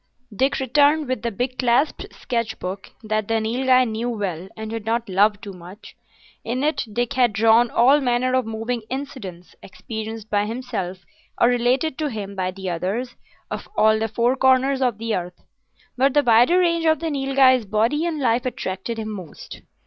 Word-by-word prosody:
Dick 270 Hz, +5 st, +1 dB
returned 290 Hz, +3 st, +3 dB
with 255 Hz, 0 st, -2 dB
the 235 Hz, -, -1 dB
big 250 Hz, +4 st, -4 dB
clasped 250 Hz, +4 st, +1 dB
sketch 230 Hz, -3 st, -3 dB
book 190 Hz, +2 st, -6 dB
that 215 Hz, -1 st, -1 dB
the 225 Hz, 0 st, +1 dB
Nilghai 255 Hz, +3 st, +2 dB
knew 225 Hz, +2 st, -3 dB
well 190 Hz, -6 st, -4 dB
and 220 Hz, 0 st, -6 dB
did 225 Hz, -1 st, -4 dB
not 230 Hz, +2 st, -1 dB
love 205 Hz, +2 st, +2 dB
too 205 Hz, -3 st, -9 dB
much. 180 Hz, +4 st, -13 dB, 0.5 s
In 250 Hz, +4 st, -2 dB
it 305 Hz, +2 st, 0 dB
Dick 240 Hz, +2 st, -1 dB
had 245 Hz, -4 st, +2 dB
drawn 225 Hz, +3 st, +4 dB
all 270 Hz, +5 st, +4 dB
manner 250 Hz, 0 st, +1 dB
of 255 Hz, -2 st, +1 dB
moving 225 Hz, +2 st, -3 dB
incidents, 240 Hz, -10 st, -7 dB
experienced 220 Hz, +3 st, -7 dB
by 205 Hz, -1 st, 0 dB
himself 215 Hz, -7 st, -5 dB, 0.3 s
or 240 Hz, -, +5 dB
related 250 Hz, +5 st, +1 dB
to 305 Hz, -1 st, -1 dB
him 200 Hz, -4 st, -6 dB
by 185 Hz, -1 st, -1 dB
the 190 Hz, 0 st, -7 dB
others, 195 Hz, +9 st, -3 dB, 0.4 s
of -, -, -6 dB
all 220 Hz, 0 st, +4 dB
the 225 Hz, -, 0 dB
four 235 Hz, +3 st, +1 dB
corners 265 Hz, +1 st, +3 dB
of 245 Hz, -5 st, +1 dB
the 225 Hz, -1 st, -2 dB
earth. 180 Hz, -1 st, -6 dB, 0.5 s
But 270 Hz, +2 st, +2 dB
the 290 Hz, -, +4 dB
wider 245 Hz, +8 st, +5 dB
range 335 Hz, -2 st, +2 dB
of 315 Hz, 0 st, +4 dB
the 330 Hz, -1 st, -3 dB
Nilghai's 270 Hz, -3 st, +3 dB
body 225 Hz, +9 st, +1 dB
and 320 Hz, -3 st, -3 dB
life 245 Hz, -1 st, +1 dB
attracted 195 Hz, -1 st, -4 dB
him 220 Hz, -1 st, -4 dB
most. 185 Hz, -7 st, -9 dB
235 Hz, 180 wpm, -22 LUFS, 210-260 Hz, 0.5 s, or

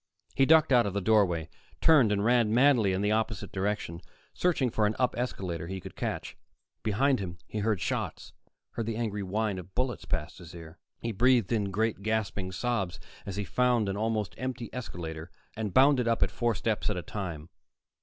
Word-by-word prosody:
He 135 Hz, -, +3 dB
ducked 160 Hz, -2 st, +6 dB
out 120 Hz, -4 st, +5 dB
of 100 Hz, -, -3 dB
the -, -, +2 dB
doorway, 90 Hz, -6 st, +2 dB, 0.3 s
turned 140 Hz, -10 st, +5 dB
and 100 Hz, 0 st, +1 dB
ran 120 Hz, -2 st, +3 dB
madly 120 Hz, -4 st, +4 dB
in 95 Hz, +1 st, 0 dB
the 105 Hz, +1 st, +1 dB
opposite 110 Hz, -2 st, -1 dB
direction, 95 Hz, -3 st, -2 dB, 0.3 s
searching 150 Hz, -9 st, +1 dB
for 110 Hz, -1 st, +2 dB
an 105 Hz, -, -1 dB
up 125 Hz, -1 st, +1 dB
escalator 90 Hz, -9 st, -3 dB
he 95 Hz, +1 st, -4 dB
could -, -, -10 dB
catch. -, -, -4 dB, 0.5 s
Behind 130 Hz, +5 st, +2 dB
him 90 Hz, -3 st, -5 dB
he 110 Hz, -, -5 dB
heard 105 Hz, -2 st, +1 dB
shots, -, -, -3 dB, 0.4 s
heard 115 Hz, -2 st, -4 dB
the 115 Hz, -, -2 dB
angry 110 Hz, -3 st, -2 dB
whine 100 Hz, 0 st, -1 dB
of 95 Hz, +1 st, -12 dB
bullets 125 Hz, 0 st, -1 dB
past 80 Hz, +2 st, -3 dB
his 85 Hz, -1 st, -11 dB
ear. 80 Hz, 0 st, -11 dB, 0.2 s
He 115 Hz, -, -2 dB
breathed 120 Hz, -1 st, +3 dB
in 105 Hz, -4 st, +1 dB
great, 110 Hz, +2 st, -1 dB
gasping 100 Hz, -3 st, -2 dB
sobs 100 Hz, -2 st, -2 dB, 0.3 s
as 100 Hz, -, -4 dB
he 105 Hz, -, -2 dB
found 120 Hz, +1 st, +2 dB
an 95 Hz, -, -2 dB
almost 110 Hz, -1 st, -1 dB
empty 125 Hz, -2 st, -4 dB
escalator, 85 Hz, -9 st, -6 dB, 0.3 s
and 110 Hz, -2 st, -3 dB
bounded 130 Hz, +1 st, +5 dB
up 115 Hz, -1 st, +3 dB
it -, -, 0 dB
four 120 Hz, -2 st, 0 dB
steps 110 Hz, +1 st, -1 dB
at 105 Hz, -, -2 dB
a 90 Hz, -, -4 dB
time. 85 Hz, -6 st, -6 dB
105 Hz, 195 wpm, -29 LUFS, 95-120 Hz, 0.5 s, ducked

